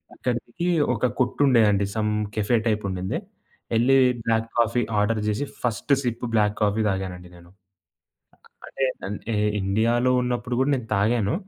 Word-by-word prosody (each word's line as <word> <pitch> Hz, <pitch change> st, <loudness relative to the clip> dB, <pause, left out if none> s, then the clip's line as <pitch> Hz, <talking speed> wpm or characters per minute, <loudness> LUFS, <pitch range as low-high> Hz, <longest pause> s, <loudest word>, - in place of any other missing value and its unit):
అక్కడికి 125 Hz, +7 st, -3 dB, 0.3 s
ఒక -, -, -1 dB
కొట్టుండేదండి 115 Hz, -6 st, +3 dB
some 105 Hz, -1 st, 0 dB, 0.2 s
cafe 110 Hz, +3 st, +2 dB
type 105 Hz, -1 st, 0 dB
ఉండింది. 95 Hz, 0 st, -3 dB, 0.6 s
యెళ్లి 125 Hz, +4 st, +4 dB, 0.3 s
బ్లాక్ 115 Hz, 0 st, +1 dB
కాఫీ 120 Hz, +1 st, +2 dB, 0.2 s
ఆర్డర్ 110 Hz, +2 st, +1 dB
జేసి 105 Hz, +7 st, -1 dB, 0.2 s
ఫస్ట్ 120 Hz, +3 st, -2 dB
సిప్ 120 Hz, -1 st, -3 dB
బ్లాక్ 105 Hz, -2 st, +2 dB
కాఫీ 105 Hz, +1 st, +2 dB
తాగానండి 95 Hz, -2 st, -4 dB
నేను. 85 Hz, 0 st, -16 dB, 1.2 s
అ -, -, -9 dB, 0.4 s
అంటే 105 Hz, +2 st, -5 dB, 0.3 s
ఇండియాలో 115 Hz, +5 st, +1 dB
ఉన్నప్పుడు 125 Hz, 0 st, -2 dB
గూడా 135 Hz, +2 st, +2 dB
నేను 125 Hz, -, -6 dB
తాగాను. 105 Hz, +1 st, +1 dB
110 Hz, 130 wpm, -24 LUFS, 105-120 Hz, 1.2 s, యెళ్లి